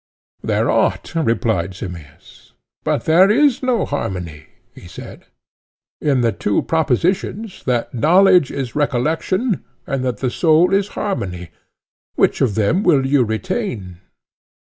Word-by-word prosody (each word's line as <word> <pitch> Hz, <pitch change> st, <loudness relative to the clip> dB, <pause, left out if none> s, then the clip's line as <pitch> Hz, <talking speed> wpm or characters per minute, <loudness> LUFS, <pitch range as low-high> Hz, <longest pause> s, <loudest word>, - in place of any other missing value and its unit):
There -, -, 0 dB
ought, -, -, 0 dB
replied 115 Hz, -, 0 dB
Simmias. 85 Hz, -7 st, -11 dB, 0.3 s
But -, -, -1 dB
there 175 Hz, +5 st, +5 dB
is 270 Hz, +3 st, +3 dB
no 250 Hz, -5 st, +1 dB
harmony, 90 Hz, -, -5 dB, 0.3 s
he -, -, -13 dB
said, 90 Hz, -, -11 dB, 0.8 s
in 140 Hz, -4 st, +1 dB
the 115 Hz, -1 st, +2 dB
two 100 Hz, 0 st, -1 dB
propositions 180 Hz, -, -1 dB
that 120 Hz, -2 st, -1 dB
knowledge 180 Hz, -, +4 dB
is 130 Hz, -4 st, -5 dB
recollection, 160 Hz, -, 0 dB, 0.2 s
and 135 Hz, -1 st, -2 dB
that 125 Hz, -1 st, -2 dB
the 130 Hz, -2 st, -2 dB
soul 170 Hz, +5 st, +3 dB
is 200 Hz, +1 st, +1 dB
a -, -, -17 dB
harmony. 90 Hz, -, -4 dB, 0.6 s
Which -, -, +1 dB
of 110 Hz, -7 st, +1 dB
them 110 Hz, -, +1 dB
will 150 Hz, -9 st, +3 dB
you 135 Hz, -1 st, +3 dB
retain? 110 Hz, -, -4 dB
140 Hz, 130 wpm, -19 LUFS, -, 0.8 s, there